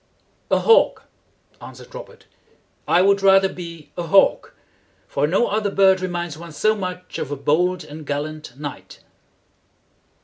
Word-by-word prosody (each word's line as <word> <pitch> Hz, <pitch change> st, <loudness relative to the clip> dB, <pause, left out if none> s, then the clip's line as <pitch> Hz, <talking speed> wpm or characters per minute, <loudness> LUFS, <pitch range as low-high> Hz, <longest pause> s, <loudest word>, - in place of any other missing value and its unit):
"A -, -, +3 dB
hawk," 455 Hz, -, +3 dB, 0.6 s
answered -, -, -12 dB
Robert. -, -, -11 dB, 0.6 s
"I 180 Hz, -, +4 dB
would 200 Hz, 0 st, +3 dB
rather 195 Hz, 0 st, +5 dB
be 170 Hz, -5 st, -10 dB
a -, -, -4 dB
hawk, 185 Hz, +4 st, +2 dB, 0.5 s
for 145 Hz, -, 0 dB
no 190 Hz, +9 st, +2 dB
other 210 Hz, -1 st, -1 dB
bird 190 Hz, -1 st, +3 dB
reminds 175 Hz, -4 st, -4 dB
one 170 Hz, -1 st, -10 dB
so 215 Hz, +7 st, +2 dB
much 180 Hz, -3 st, -6 dB
of -, -, -4 dB
a 145 Hz, -, -3 dB
bold 175 Hz, +6 st, 0 dB
and 155 Hz, +1 st, -10 dB
gallant 145 Hz, -2 st, -5 dB
knight." 145 Hz, -2 st, -8 dB
180 Hz, 140 wpm, -21 LUFS, 155-195 Hz, 0.6 s, rather